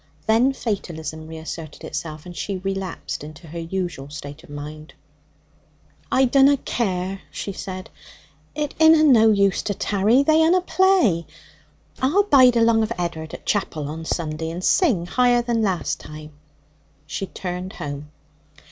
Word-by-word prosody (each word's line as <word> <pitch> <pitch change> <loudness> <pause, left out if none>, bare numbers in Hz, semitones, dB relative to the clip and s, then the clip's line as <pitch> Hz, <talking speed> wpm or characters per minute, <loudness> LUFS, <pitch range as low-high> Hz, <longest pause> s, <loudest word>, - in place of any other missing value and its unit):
Then 230 +5 +4
fatalism 160 - -4
reasserted 160 -1 -8
itself, 155 -2 -6
and 175 -1 -9
she 195 +1 -3
relapsed 195 -4 -4
into 155 +3 -11
her 165 +2 -7
usual 165 -5 -4
state 145 0 -9
of - - -17
mind. 150 +2 -9 1.2
'I 265 - +4
dunna 275 +2 +5
care,' 190 -6 -2
she 200 - -5
said. 185 -1 -7 0.6
'It 300 -2 -2
inna 320 -1 +7
no 230 -7 +6
use 200 -2 +2
to 205 - -3
tarry. 210 +9 +2
They 315 +2 +4
unna 355 +3 +4
play. 365 - +3 0.7
I'll 310 +11 +3
bide 255 -10 +6
along 230 -1 +4
of 220 +1 -1
Ed'ard 165 -3 -4
at - - -13
chapel 165 -8 -1
on 160 +2 -6
Sunday, 160 -1 -3
and 175 +2 -6
sing 235 - +3
higher 245 +4 +3
than 235 -1 0
last 190 -5 -1
time.' 150 0 -10 0.7
She 155 +6 -4
turned 180 +1 -5
home. 145 0 -6
190 Hz, 145 wpm, -22 LUFS, 160-240 Hz, 1.2 s, inna